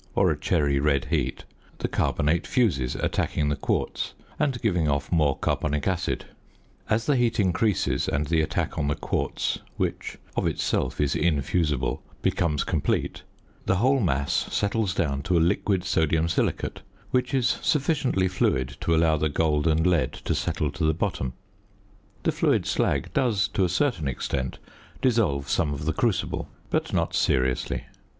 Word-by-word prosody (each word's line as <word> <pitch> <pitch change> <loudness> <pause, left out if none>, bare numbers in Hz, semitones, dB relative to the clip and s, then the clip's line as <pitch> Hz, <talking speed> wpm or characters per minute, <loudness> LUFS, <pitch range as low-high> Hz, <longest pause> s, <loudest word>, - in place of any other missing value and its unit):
or - - +4
a - - 0
cherry 70 -2 +1
red 70 -1 +2
heat) - - -1 0.3
the - - -2
carbonate 80 +5 0
fuses 85 - +1
attacking 75 -1 0
the 75 - +1
quartz, 70 - -2 0.2
and 140 -5 +1
giving 90 -8 +2
off 70 0 -1
more 75 -5 +3
carbonic 75 -1 -1
acid; 90 -2 -1 0.6
as 115 +1 +1
the 145 - +3
heat 120 -3 +1
increases, 100 +1 +1
and 75 +2 0
the 80 +2 +2
attack 80 - -2
on 75 - 0
the 75 - +1
quartz - - -2 0.2
(which - - -2 0.2
of - - +1
itself 65 - -1
is 75 -2 +1
infusible) 75 -3 0 0.2
becomes 75 -4 +1
complete, 85 -6 -1 0.5
the 95 - +3
whole 130 +8 +3
mass 70 - 0
settles 100 -2 0
down 70 -4 0
to 85 +4 +1
a - - +4
liquid 95 -2 0
sodium 80 -2 +1
silicate, 85 - -1 0.3
which 125 0 +1
is 130 -3 +1
sufficiently 140 - +1
fluid 65 -8 0
to 85 - +1
allow 80 -1 +4
the 75 +1 0
gold 75 0 +1
and 80 +1 +2
lead 90 -4 +2
to - - -3
settle - - -1
to - - -4
the 80 0 +3
bottom. 80 -9 -2 0.9
The - - +2
fluid - - +1
slag - - 0
does 105 -6 +2
to 100 - 0
a 90 - +2
certain 95 - 0
extent 65 0 -2 0.4
dissolve 105 - +1
some 80 0 +1
of 70 +1 -6
the 80 - +1
crucible, 110 +4 -1 0.2
but - - 0
not - - 0
seriously. 65 -1 +1
80 Hz, 160 wpm, -26 LUFS, 75-100 Hz, 0.9 s, or